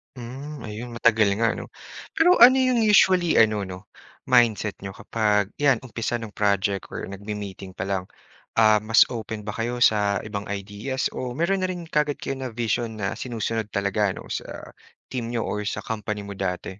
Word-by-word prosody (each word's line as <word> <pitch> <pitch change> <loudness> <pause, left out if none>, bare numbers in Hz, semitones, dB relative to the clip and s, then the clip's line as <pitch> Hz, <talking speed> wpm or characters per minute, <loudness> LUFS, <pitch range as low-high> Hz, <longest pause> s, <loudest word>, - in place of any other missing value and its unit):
Hmm, 135 +5 -8
ayun, 115 +3 -7
matagal 110 -3 +4
nga, 115 +1 +2
'no? - - -6 0.5
Pero 355 +3 +5
ano 250 +2 +9
yung 255 -2 +3
usually 190 -5 +4
ano, 105 -3 +3
'no, 90 0 -7 0.4
mindset 115 -4 +2
niyo 95 -1 -8
kapag, 105 -2 0
yan, 135 -4 +3
umpisa 120 -1 -3
ng 115 -3 -5
project 100 -2 0
or - - -6
nagme-meeting 100 -1 -7
pa 90 - -3
lang. 95 -1 -2 0.5
Ah, 110 -1 +5
mas 110 +2 +5
open 110 -2 -5
ba 105 - -4
kayo 120 +2 -1
sa 100 -2 +3
ibang 105 -1 -5
ideas, 100 +6 -3
o 125 -1 -5
mayro'n 180 +5 +1
na 185 - 0
rin 180 -2 -5
kaagad 150 -3 0
kayo 135 -1 -5
na-vision 115 -2 -2
na, 100 -2 -2
sinusunod 115 -3 -3
talaga, 100 0 +1
'no, - - -10
sa - - -6 0.4
team 120 -3 -3
niyo 120 -1 -2
or 105 0 -3
sa - - -3
company 105 -2 -4
mo 100 - -8
dati? 95 0 -4
110 Hz, 175 wpm, -24 LUFS, 100-125 Hz, 0.5 s, ano